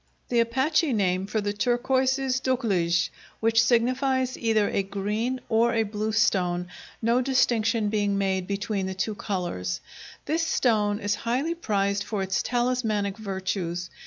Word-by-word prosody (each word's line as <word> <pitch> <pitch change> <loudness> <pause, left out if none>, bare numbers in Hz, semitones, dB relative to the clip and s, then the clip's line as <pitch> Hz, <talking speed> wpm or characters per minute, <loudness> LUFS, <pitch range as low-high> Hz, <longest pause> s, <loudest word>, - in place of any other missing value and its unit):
The 240 - +2
Apache 265 +6 +2
name 190 -2 +1
for 215 +1 -1
the 205 0 -2
turquoise 255 +4 +1
is 265 -1 -1
duklij, 195 -10 +1 0.3
which 225 +1 +4
signifies 255 +2 +1
either 220 -3 +1
a - - 0
green 210 +6 -2
or 230 +1 +2
a 225 - +3
blue 215 +1 -3
stone, 180 -5 +1 0.3
no 235 +3 +3
distinction 230 -4 +2
being 205 -1 0
made 190 -2 0
between 200 -1 -2
the 190 - -4
two 210 +3 -1
colors. 175 - -3 0.5
This 320 +2 0
stone 220 -10 +2
is 205 -1 0
highly 260 +8 0
prized 200 -10 0
for 200 -2 -2
its 190 0 0
talismanic 240 -5 0
virtues. 190 -3 -3
215 Hz, 145 wpm, -26 LUFS, 195-245 Hz, 0.5 s, which